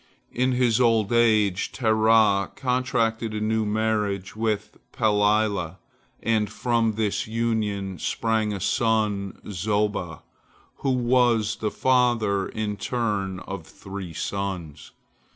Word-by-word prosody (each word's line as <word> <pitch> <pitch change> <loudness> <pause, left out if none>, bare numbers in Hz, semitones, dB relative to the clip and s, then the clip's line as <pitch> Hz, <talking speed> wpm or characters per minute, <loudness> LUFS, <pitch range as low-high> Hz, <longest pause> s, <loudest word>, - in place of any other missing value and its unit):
In 125 +1 +1
his 125 -1 +2
old 115 -2 +3
age 110 -5 +3
Terah 110 -3 +3
contracted 120 -4 0
a - - -1
new 110 0 0
marriage 105 -3 -1
with 110 -2 -2
Pelilah, 105 -4 +1 0.5
and 110 -2 +1
from 115 -1 0
this 105 -1 -1
union 105 -5 -2
sprang 110 +2 0
a 100 - -3
son 105 -1 0
Zoba, 100 -3 -2 0.5
who 135 - -2
was 120 -3 +2
the 110 - -1
father 120 -6 +2
in 105 -1 -3
turn 100 -5 -2
of - - -7
three 95 -3 -8
sons. 90 -3 -4
110 Hz, 110 wpm, -25 LUFS, 100-115 Hz, 0.5 s, old